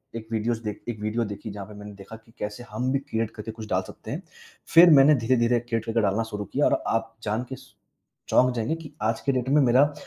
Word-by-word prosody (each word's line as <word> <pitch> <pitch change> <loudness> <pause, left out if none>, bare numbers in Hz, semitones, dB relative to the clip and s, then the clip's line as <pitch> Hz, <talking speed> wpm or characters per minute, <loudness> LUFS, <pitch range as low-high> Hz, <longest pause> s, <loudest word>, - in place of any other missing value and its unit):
एक 110 -1 -6
विदियोस 115 +1 0
देखी, 110 +2 -5
एक 110 - -10
वीडियो 110 +2 0
देखी 105 +1 -7
जहाँ 100 -1 -7
पर 105 - -11
मैंने 105 0 -9
देखा 100 +3 -11
कि 115 0 -18
कैसे 105 +4 -5
हम 130 +1 -1
भी 140 - +2
क्रीऐट 115 -5 -3
करके 110 +1 -7
कुछ 110 -1 -9
डाल 95 0 +1
सकते - - -10
हैं। - - -4 0.5
फिर 170 +1 +9
मैंने 145 +1 +7
धीरे-धीरे 120 -1 +2
क्रीऐट 115 -1 -3
करके 115 0 +1
डालना 105 +2 +1
शुरू 105 -1 -4
किया - - +2
और - - +2
आप 115 0 -1
जानके 120 +5 -3
स 130 0 -18 0.6
चौंक 125 0 +4
जाएँगे 115 +7 -1
कि 165 -3 -10
आज 110 +1 +1
के 140 - +1
डेट 130 0 -1
में 150 +1 +5
मेरा 135 +3 +4
115 Hz, 240 wpm, -25 LUFS, 110-125 Hz, 0.6 s, फिर